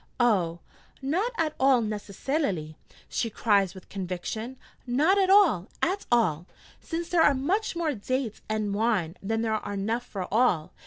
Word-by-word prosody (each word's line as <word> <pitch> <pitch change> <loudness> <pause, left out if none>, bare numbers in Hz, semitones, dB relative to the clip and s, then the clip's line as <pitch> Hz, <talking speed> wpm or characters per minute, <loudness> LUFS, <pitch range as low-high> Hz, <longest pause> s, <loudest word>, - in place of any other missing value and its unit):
'Oh, 180 -8 +2 0.4
not 345 - 0
at 315 -2 0
all 265 -1 +5
necessalily!' 210 - -2 0.3
she 230 - -1
cries 200 -4 +2
with 190 - -12
conviction: 195 +6 -5 0.3
'not 310 +11 +3
at 380 -1 +3
all, 380 - +5 0.2
at 385 +3 0
all: 180 -8 +2 0.3
since 335 0 -4
there 345 -2 +2
are 290 -3 +5
much 370 +11 0
more 330 -3 0
dates 250 0 -3
and 215 -2 -1
wine 200 -6 0
than 225 +3 -1
are 215 -2 -2
enough 220 +5 -1
for 195 -6 -5
all. 215 -9 +2
230 Hz, 150 wpm, -27 LUFS, 195-290 Hz, 0.4 s, all